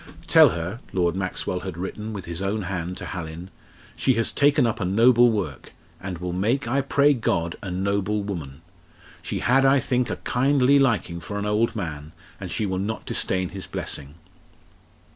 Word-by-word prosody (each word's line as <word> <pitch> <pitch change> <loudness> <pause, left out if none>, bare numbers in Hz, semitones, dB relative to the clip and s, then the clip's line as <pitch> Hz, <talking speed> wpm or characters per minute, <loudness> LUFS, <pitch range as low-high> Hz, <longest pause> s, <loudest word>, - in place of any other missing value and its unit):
"Tell - - +7
her," 85 +7 -4
Lord 90 -2 +1
Maxwell 95 -1 -2
had 95 -3 -6
written 105 +4 -5
with 100 -4 -6
his 85 +1 -4
own 100 +2 -1
hand 90 -1 -4
to 90 - -6
Hallin, 85 0 -7 0.4
"she 130 - +2
has 115 0 0
taken 145 -2 +3
up 115 0 -1
a - - -1
noble 115 +6 +5
work, 100 - -4 0.3
and 95 -2 -5
will 90 +1 -4
make, 115 +9 0
I 135 +4 +1
pray 140 +1 +3
God, 85 -9 -1
a 95 - -5
noble 100 +3 -1
woman. 80 -7 -6 0.6
She - - -4
had, 135 +2 +4
I 135 +1 +5
think, 125 -1 0
a - - -1
kindly 135 +2 +3
liking 110 -10 +1
for 100 +5 -6
an 105 - -2
old 105 +3 +1
man, 80 -6 -5 0.3
and - - -6
she 110 - -1
will 95 -1 -2
not 110 +3 -3
disdain 95 -1 -1
his 95 0 -7
blessing." 70 +2 -5
100 Hz, 180 wpm, -24 LUFS, 90-120 Hz, 0.6 s, Tell